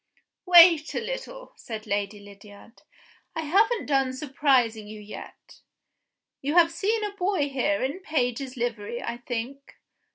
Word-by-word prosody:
"Wait 340 -3 +7
a - - +1
little," - - -7
said 220 -2 -8
Lady 205 0 -2
Lydiard, 205 +2 -15 0.5
"I 325 - -2
haven't 415 +9 +2
done 270 -2 +1
surprising 260 -6 +1
you 215 0 -9
yet. 210 0 -12 0.8
You 290 +4 -2
have 335 -1 +6
seen 425 +6 -1
a 415 - -2
boy 365 -6 0
here 275 +2 0
in 275 +7 -2
a - - -13
page's 260 -6 -2
livery, 235 -1 -3
I 235 - -4
think? 245 +3 -6
270 Hz, 140 wpm, -26 LUFS, 230-335 Hz, 0.8 s, Wait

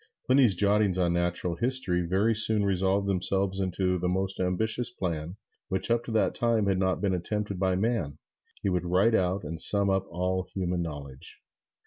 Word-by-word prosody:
Pliny's 130 -6 +4
jottings 100 0 +2
on 85 -2 +1
natural 85 0 -1
history 120 -5 0
very 95 +6 +1
soon 110 -1 +4
resolved 95 +1 0
themselves 95 0 0
into 90 -1 -1
the 90 +1 -1
most 95 +1 -2
ambitious 110 +6 +1
plan, 85 -6 -5 0.3
which 95 +4 +1
up 115 0 +1
to - - -6
that 110 - +1
time 115 -3 0
had 95 -1 0
not 95 -1 -1
been 100 -2 0
attempted 100 +2 -3
by 95 -1 +1
man 95 -8 -2 0.5
he 100 - 0
would 90 -2 -1
write 95 +6 +2
out 95 -1 0
and 80 +2 -5
sum 100 -1 +5
up 95 0 -1
all 90 +1 -2
human 90 -2 -2
knowledge. 70 -5 -8
95 Hz, 175 wpm, -27 LUFS, 90-105 Hz, 0.5 s, sum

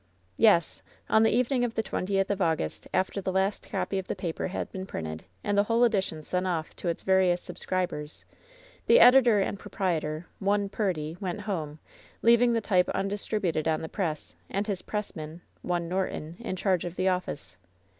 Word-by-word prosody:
"Yes. 210 -7 +4 0.3
On 220 - +5
the 225 - +5
evening 250 +1 +2
of 235 -2 -2
the 225 - 0
twentieth 195 -1 -1
of 200 -1 -2
August, 160 - -1
after 190 +1 0
the 190 - -2
last 190 +2 0
copy 190 -1 -1
of 190 - -7
the - - -2
paper 175 -4 -3
had 190 - -4
been 190 0 -6
printed, 80 - -5 0.2
and 205 - 0
the 205 0 +4
whole 230 +2 +3
edition 190 -9 +1
sent 180 +4 -1
off 165 -3 -2
to - - -5
its 170 - -2
various 190 -2 +3
subscribers, 175 -7 -4 0.6
the 480 - +7
editor 245 -4 +7
and 195 0 -1
proprietor, 160 -4 -2
one 200 0 +1
Purdy, 170 -7 -2
went 190 0 -3
home, 160 -8 -4 0.5
leaving 235 +1 +5
the 230 - +1
type 185 -4 +2
undistributed 195 -5 -1
on 160 0 0
the - - -3
press, 165 -7 -3
and 200 +2 -1
his 200 -4 -2
pressman, 165 -6 -5 0.2
one 175 -1 -1
Norton, 175 -3 -3
in 230 -5 -4
charge 185 -1 +1
of 175 0 -5
the 185 +1 0
office. 180 - -2
190 Hz, 180 wpm, -28 LUFS, 170-205 Hz, 0.6 s, the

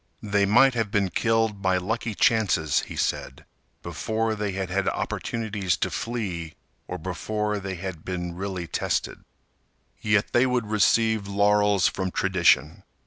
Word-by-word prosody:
They 100 -1 +1
might 130 +6 +5
have 115 -3 -1
been 100 -2 0
killed 110 0 +1
by 95 -1 +2
lucky 110 +4 -3
chances, 95 - +2
he - - -8
said, - - -3 0.4
before 110 0 -2
they 105 -2 -3
had 95 -1 -4
had 95 +1 +1
opportunities 105 -6 -2
to 90 - -1
flee 90 -4 -4 0.3
or - - -4
before 105 -1 -3
they 95 -1 -5
had 90 -2 -6
been 90 -2 -4
really 95 -1 -4
tested. - - -2 0.8
Yet 105 -1 +1
they 125 +2 +4
would 125 -2 0
receive 110 0 +2
laurels 100 -1 +3
from 95 -1 -2
tradition. 90 -2 +2
100 Hz, 140 wpm, -25 LUFS, 95-110 Hz, 0.8 s, might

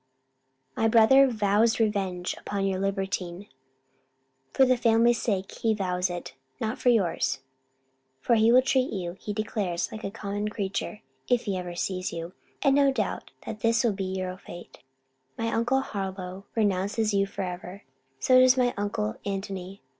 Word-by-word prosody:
My 225 - +2
brother 235 +5 +6
vows 220 -1 +2
revenge 195 -5 0
upon 200 -1 -2
your 190 -1 0
libertine 195 -1 -3 1.0
for 265 - +5
the 255 0 +4
family's 235 0 +3
sake 195 -4 -1
he 225 -1 +2
vows 180 -2 -1
it 175 0 -6 0.3
not 220 +2 -2
for 250 - +3
yours! 185 - +1 0.8
for 235 - +1
he 225 0 +5
will 255 +1 +6
treat 260 -1 +1
you, 175 -3 -4
he 210 - -5
declares, 205 -4 -2
like 220 - -8
a - - -2
common 205 +1 -4
creature, 210 0 -4 0.2
if 245 -2 +1
ever 185 -3 -2
he 175 - -7
sees 185 +1 -2
you: 170 +1 -6 0.3
and 275 -1 +4
doubts 275 -1 +4
not 215 - -2
that 215 - -6
this 230 +1 +2
will 230 -3 +2
be 195 -1 -3
your 185 -1 -3
fate. 175 -2 -11 0.6
My 230 0 -1
uncle 240 +4 +2
Harlowe 190 -4 -5
renounces 205 +1 +1
you 195 0 +2
for 195 - -5
ever. 180 +2 -7 0.4
So 255 - +5
does 255 0 +6
my 245 -1 +2
uncle 200 - -2
Antony. 195 -2 -5
205 Hz, 160 wpm, -27 LUFS, 185-230 Hz, 1.0 s, brother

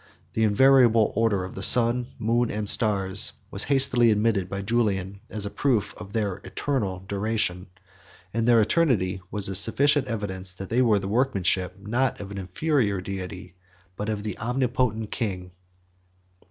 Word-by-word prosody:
The 110 - -2
invariable 115 0 +4
order 110 -4 +1
of 95 - -8
the 95 - -7
sun, 120 +3 +5
moon, 120 +1 0
and 105 0 -4
stars, 100 -4 +2 0.2
was 95 - -1
hastily 130 -4 +3
admitted 105 -3 0
by 100 +1 -5
Julian, 100 -3 -1
as 105 -1 -3
a 100 - -5
proof 115 -8 0
of 100 -1 -11
their 100 -4 -2
eternal 100 -11 -3
duration; 100 -3 -2 0.7
and 115 +1 -1
their 120 -1 +5
eternity 110 - +1
was 105 -2 -1
a 95 - -3
sufficient 140 +9 +4
evidence 95 -5 -2
that 95 +1 -9
they 120 +3 +1
were 115 -4 +3
the 95 -1 -4
workmanship, 95 -6 0
not 125 +5 -1
of 100 -1 -8
an 100 - -6
inferior 100 - -1
deity, 90 -1 -7 0.4
but 105 +3 -4
of 105 -1 -3
the 105 - -6
Omnipotent 120 -2 -1
King. 90 -5 -4
105 Hz, 155 wpm, -24 LUFS, 95-120 Hz, 0.7 s, sun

